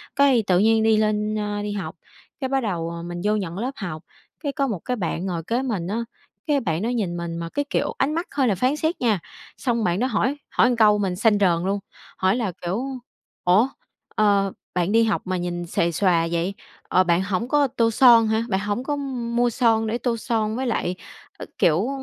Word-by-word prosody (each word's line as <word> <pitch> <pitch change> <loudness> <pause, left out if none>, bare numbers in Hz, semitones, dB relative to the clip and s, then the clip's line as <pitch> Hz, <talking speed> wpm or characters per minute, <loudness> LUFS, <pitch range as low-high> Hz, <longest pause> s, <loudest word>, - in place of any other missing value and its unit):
Cái, 275 -5 +4
tự 180 -1 +4
nhiên 220 +1 +4
đi 220 -1 +4
lên, 215 0 +1
ơ, 210 -1 -2
đi 205 0 -3
học, 205 -1 -5 0.4
cái, 265 - -1
bắt 270 0 +1
đầu, 170 -5 -2
ờ, 170 0 -6
mình 175 0 -6
vô 210 +1 +2
nhận 185 -3 -3
lớp 250 +5 -2
học, 160 -3 -5 0.4
cái, 285 - -1
có 275 -2 0
một 205 -8 -3
cái 250 - -1
bạn 175 -2 -2
ngồi 170 -4 -3
kế 235 +2 0
mình 210 -10 -2
á, 225 +4 -2 0.4
cái 290 -2 +3
bạn 170 -6 -2
đó 230 - -1
nhìn 200 -8 -1
mình 170 -1 -4
mà 165 0 -4
cái, 285 +7 -2
kiểu, - - 0
ánh 295 +3 +1
mắt 335 +3 -2
hơi 270 -3 +2
là 205 - +2
phán 255 +9 +1
xét 315 +1 -2
nha, 220 -6 +2 0.4
xong 235 -3 0
bạn 180 +1 +1
đó 255 - +1
hỏi 255 +5 0
hỏi 245 - +3
một 245 - +1
câu 210 -1 +6
mình 195 -3 -1
xanh 215 +1 +3
rờn 175 -3 +2
luôn, 200 +1 0 0.4
hỏi 190 +3 +2
là, 220 -7 -1
kiểu: 190 +8 -2 0.6
"Ủa, 195 +8 +4 0.5
ờ, 200 -2 +3 0.2
bạn 180 +2 +1
đi 230 +1 +5
học 220 -3 0
mà 185 0 -1
nhìn 175 0 -3
xuề 170 +1 0
xòa 170 -2 +2
vậy, 170 +3 -1 0.3
ờ, 185 - +3
bạn 180 +1 +2
hổng 195 +4 -2
có 290 +1 +3
tô 230 -2 +1
son 230 -2 +6
hả, 220 +1 +1
bạn 190 -1 +1
hổng 205 +5 -2
có 290 +1 -1
m 250 -4 -4
mua 240 0 +3
son 225 -2 +2
để 225 - -1
tô 245 -1 -1
son 220 -2 -1
với 260 +1 -2
lại, 180 -6 -1 0.4
ác - - -8
kiểu, 175 +8 +3
215 Hz, 230 wpm, -23 LUFS, 180-240 Hz, 0.6 s, câu